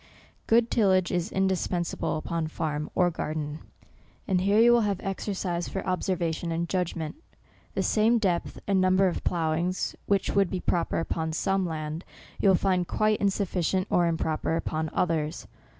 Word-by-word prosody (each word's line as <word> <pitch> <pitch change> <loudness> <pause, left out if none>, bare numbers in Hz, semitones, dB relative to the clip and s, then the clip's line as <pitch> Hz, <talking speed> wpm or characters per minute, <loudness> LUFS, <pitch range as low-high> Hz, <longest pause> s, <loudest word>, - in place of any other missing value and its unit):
Good 230 +1 +3
tillage 190 -5 +3
is 180 +3 -1
indispensable, 185 -4 0
upon 165 0 -2
farm 150 -1 -3
or 180 -1 +3
garden; 155 -1 -4 0.7
and 185 -2 +2
here 200 +2 +3
you 235 +1 +7
will 240 0 +5
have 200 -3 0
exercise 190 -3 -3
for 190 - -4
observation 175 -3 -1
and 170 +1 -1
judgment. 170 - -2 0.6
The - - +1
same 225 +2 +3
depth 185 -6 -1
and 195 -2 +2
number 185 +1 +4
of 175 - -2
ploughings 170 +2 -1
which 200 -2 +1
would 200 -3 +2
be 185 - -2
proper 175 -1 0
upon 160 -1 -2
some 195 +2 0
land, 155 +1 -4 0.4
you 195 - +4
will 190 - +6
find 180 -1 +1
quite 215 0 +1
insufficient, 190 -2 0
or 175 -1 +3
improper 160 -1 -1
upon 160 -1 -2
others. 160 -3 -1
180 Hz, 155 wpm, -27 LUFS, 165-195 Hz, 0.7 s, you